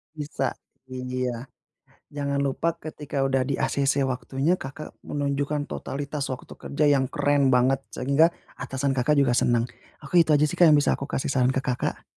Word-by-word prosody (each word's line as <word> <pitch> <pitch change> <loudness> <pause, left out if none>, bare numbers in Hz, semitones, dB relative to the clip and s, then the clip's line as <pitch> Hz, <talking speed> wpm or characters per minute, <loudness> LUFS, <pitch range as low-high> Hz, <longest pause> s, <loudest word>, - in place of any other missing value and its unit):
Bisa, 150 0 -2 0.3
iya. 125 -1 -4 0.6
Jangan 140 -1 -3
lupa 140 +4 0
ketika 150 -3 -4
udah 135 -1 +1
di-acc 140 +1 0
waktunya, 130 +5 0
Kakak 155 -2 -8
menunjukkan 145 +1 -2
totalitas 145 0 -4
waktu 130 - -7
kerja 145 +2 -2
yang 135 -2 +3
keren 145 -2 +2
banget, 130 +2 +3
sehingga 145 +6 +3 0.3
atasan 135 +1 -2
Kakak 140 +3 +2
juga 130 -3 +3
senang. 120 -1 +2 0.4
Aku 170 +5 +4
itu 160 - -4
aja 150 0 +5
sih, - - -4
Kak, 170 -3 +6
yang 150 - +6
bisa 145 - +2
aku - - -5
kasih 135 - -1
saran 125 -1 +3
ke 135 - -1
Kakak. 125 -1 -2
140 Hz, 165 wpm, -25 LUFS, 130-145 Hz, 0.6 s, Kak